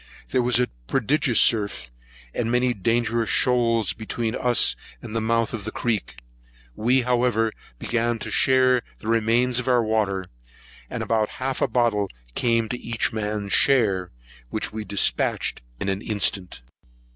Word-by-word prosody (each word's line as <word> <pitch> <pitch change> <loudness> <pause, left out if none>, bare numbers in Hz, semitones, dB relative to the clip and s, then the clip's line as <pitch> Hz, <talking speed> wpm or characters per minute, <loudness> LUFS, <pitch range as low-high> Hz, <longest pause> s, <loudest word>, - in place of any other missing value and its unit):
There 130 - +1
was 120 0 +2
a 125 - +3 0.2
prodigious 135 - +1
surf, 100 - +2 0.4
and 115 -1 -1
many 125 0 +2
dangerous 115 +1 0
shoals, 115 -4 +2
between 110 0 -3
us 125 -1 +3 0.2
and 115 -2 -8
the 115 - 0
mouth 115 +1 0
of 110 -3 -5
the 110 - -4
creek; 105 - -3 0.5
we, 125 +4 +2
however, 120 -2 +1 0.3
began 120 - -1
to - - -6
share 130 -1 +4 0.2
the - - -10
remains 115 +2 +2
of 125 - -5
our 125 -2 +3
water, 105 -4 0 0.6
and - - -4
about 110 -2 0
half 130 0 -3
a - - +3
bottle 115 -5 +1 0.2
came 115 - +1
to 125 - -4
each 115 -1 -1
man's 105 -2 -3
share, 105 -9 +3 0.4
which 110 - -3
we 110 0 -4
dispatched 100 -2 0 0.2
in - - -3
an 95 0 -1
instant. 100 - -1
115 Hz, 150 wpm, -24 LUFS, 105-125 Hz, 0.6 s, share